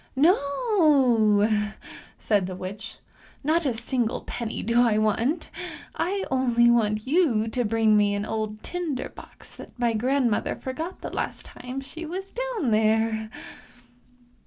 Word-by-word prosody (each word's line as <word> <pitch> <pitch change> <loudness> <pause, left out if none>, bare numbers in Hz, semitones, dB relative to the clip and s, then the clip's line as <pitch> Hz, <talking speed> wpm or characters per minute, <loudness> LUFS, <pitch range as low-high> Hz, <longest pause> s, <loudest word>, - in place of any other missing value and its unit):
" - - -36
No," 280 - +3 0.7
said 200 -4 +1
the 185 - -5
witch, 200 +4 -7 0.2
" - - -27
not 315 +2 +2
a 255 - +1
single 235 0 -1
penny 235 -2 -5
do 235 +2 +3
I 230 -3 +3
want; 225 - 0 0.4
I 390 +3 -1
only 240 -2 +4
want 215 -2 +1
you 260 -8 +2
to 245 +2 -1
bring 220 -1 +3
me 205 -1 +3
an 205 +1 -2
old 215 -1 -4
tinder 335 -7 -3
box - - -14
that - - -12
my 240 -1 +1
grand 250 +2 +1
mother 205 - -1
forgot 320 +8 -6
the - - -6
last - - -4
time 255 +2 -7
she 280 +5 -9
was 380 +4 -6
down 485 - -2
there! 220 0 +2
240 Hz, 150 wpm, -25 LUFS, 215-285 Hz, 0.7 s, only